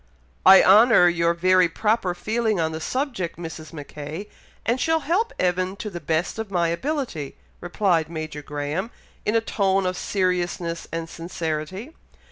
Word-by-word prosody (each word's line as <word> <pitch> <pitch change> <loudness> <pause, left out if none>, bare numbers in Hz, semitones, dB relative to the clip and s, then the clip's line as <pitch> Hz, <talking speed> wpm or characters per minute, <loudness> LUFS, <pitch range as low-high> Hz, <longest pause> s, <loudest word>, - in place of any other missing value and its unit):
"I 190 0 +10
honour 210 -1 +7
your 170 0 +2
very 185 0 +4
proper 210 -1 0
feeling 220 -1 -1
on 160 -1 0
the 160 0 -5
subject, 250 - -3
Mrs. 160 -2 -8
Mackay, 150 +5 -7 0.4
and 240 +3 +1
shall 320 0 +2
help 390 - 0
Evan 185 +1 0
to 210 +1 -6
the 175 - -6
best 160 +6 -1
of 220 -2 -4
my 175 -3 +1
ability," 230 - -3 0.2
replied 175 -3 0
Major 155 -2 -5
Graham, 145 +8 -3 0.4
in 210 - +2
a 225 - +4
tone 195 -3 +1
of 185 0 -1
seriousness 180 -3 -1
and 165 0 -3
sincerity. 165 - -5
180 Hz, 150 wpm, -23 LUFS, 165-215 Hz, 0.4 s, I